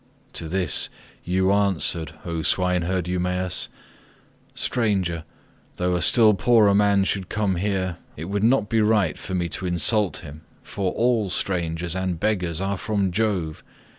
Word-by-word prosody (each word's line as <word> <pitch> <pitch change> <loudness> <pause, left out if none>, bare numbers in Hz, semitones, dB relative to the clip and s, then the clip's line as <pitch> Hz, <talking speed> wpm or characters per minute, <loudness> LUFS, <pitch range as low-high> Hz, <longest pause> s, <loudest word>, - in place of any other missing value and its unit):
To 80 - -3
this 90 +1 +1 0.3
you 95 +2 +1
answered, 90 -5 0
O 85 -2 -3
swineherd 90 +2 0
Eumaeus, 90 0 -1 0.9
"Stranger, 95 -9 0 0.5
though 90 0 0
a 90 - -1
still 110 +4 +6
poorer 105 0 +4
man 100 -1 +3
should 95 -1 -2
come 105 -4 0
here, 95 -2 -1 0.2
it 80 - -5
would 100 +3 -2
not 115 -2 +3
be 110 +1 +1
right 105 -7 +2
for 95 - -6
me 90 -1 0
to 95 +2 -4
insult 95 +3 +1
him, 75 0 -10 0.2
for 95 -2 -2
all 115 -4 +1
strangers 85 -2 -2
and 95 -3 -2
beggars 90 -6 -1
are 95 +1 -1
from 100 -2 -1
Jove. 95 -6 -1
95 Hz, 145 wpm, -23 LUFS, 90-105 Hz, 0.9 s, still